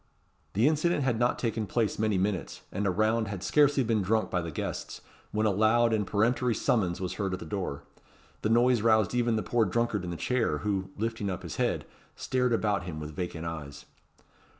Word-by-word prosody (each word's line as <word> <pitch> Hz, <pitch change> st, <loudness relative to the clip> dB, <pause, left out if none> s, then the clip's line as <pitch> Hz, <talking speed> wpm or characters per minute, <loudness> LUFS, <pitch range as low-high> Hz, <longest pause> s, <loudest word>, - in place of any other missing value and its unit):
The 110 Hz, +7 st, +3 dB
incident 155 Hz, 0 st, +2 dB
had 125 Hz, -4 st, +1 dB
not 120 Hz, +1 st, +2 dB
taken 115 Hz, -3 st, -2 dB
place 110 Hz, 0 st, 0 dB
many 110 Hz, -2 st, +1 dB
minutes, 95 Hz, -1 st, -2 dB
and 100 Hz, +2 st, -1 dB
a -, -, +3 dB
round 110 Hz, +3 st, +1 dB
had 100 Hz, -2 st, -5 dB
scarcely 145 Hz, 0 st, +4 dB
been 110 Hz, -2 st, +1 dB
drunk 110 Hz, +4 st, 0 dB
by 90 Hz, -, +1 dB
the 85 Hz, -, -5 dB
guests, 80 Hz, -, -5 dB, 0.3 s
when 110 Hz, +1 st, 0 dB
a 105 Hz, -, +4 dB
loud 110 Hz, +3 st, +3 dB
and 105 Hz, -3 st, 0 dB
peremptory 115 Hz, +3 st, +1 dB
summons 95 Hz, -7 st, +1 dB
was 90 Hz, -1 st, -3 dB
heard 95 Hz, -2 st, -1 dB
at 90 Hz, -, -3 dB
the -, -, -8 dB
door. 80 Hz, -4 st, -4 dB, 0.6 s
The 110 Hz, -, 0 dB
noise 120 Hz, 0 st, +4 dB
roused 110 Hz, -2 st, +3 dB
even 120 Hz, -2 st, +2 dB
the 110 Hz, -, -1 dB
poor 120 Hz, -2 st, +2 dB
drunkard 110 Hz, -1 st, 0 dB
in 90 Hz, -, -4 dB
the 85 Hz, -, -4 dB
chair, 120 Hz, -10 st, 0 dB
who, 95 Hz, -2 st, -1 dB
lifting 110 Hz, -1 st, -2 dB
up 95 Hz, 0 st, -4 dB
his 85 Hz, -, -6 dB
head, -, -, 0 dB, 0.3 s
stared 125 Hz, -1 st, 0 dB
about 105 Hz, -6 st, +1 dB
him 80 Hz, -4 st, -5 dB
with 75 Hz, 0 st, -7 dB
vacant 85 Hz, -2 st, -4 dB
eyes. 75 Hz, -3 st, -6 dB
110 Hz, 205 wpm, -29 LUFS, 95-115 Hz, 0.6 s, scarcely